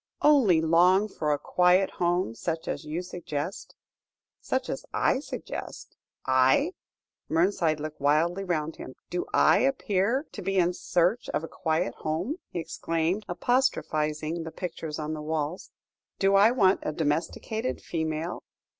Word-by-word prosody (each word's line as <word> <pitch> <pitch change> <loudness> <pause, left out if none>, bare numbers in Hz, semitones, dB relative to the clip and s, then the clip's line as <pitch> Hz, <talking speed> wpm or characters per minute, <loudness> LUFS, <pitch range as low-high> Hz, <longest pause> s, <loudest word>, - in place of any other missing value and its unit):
"Only 245 - +5
long 180 +5 +4
for 155 -7 -2
a 145 - +2
quiet 180 +5 +3
home 175 -7 +1
such 160 +6 -4
as - - -3
you 160 +4 -3
suggest." 175 -1 -5 0.6
"Such - - -2
as - - -4
I - - +2
suggest - - -7 0.3
I!" 130 - +4 0.6
Mernside 165 -2 +2
looked 155 0 -6
wildly 165 +7 +2
round 160 -4 -2
him. 130 - -9 0.2
"Do 175 - -2
I - - +5
appear 250 0 +1
to 205 - -7
be 195 +1 -1
in 180 -1 +3
search 180 +6 0
of - - -1
a - - -4
quiet 165 +1 -1
home?" 160 - -2
he - - -6
exclaimed, 165 +4 -2
apostrophising 165 - 0
the 165 - -5
pictures 165 -3 -5
on 155 0 -3
the 155 - -5
walls; 155 +2 -3 0.5
"do 195 0 +3
I 200 +3 +7
want 200 -6 +3
a 155 - -3
domesticated 165 +10 -2
female? 160 +1 -3
170 Hz, 145 wpm, -27 LUFS, 155-195 Hz, 0.6 s, I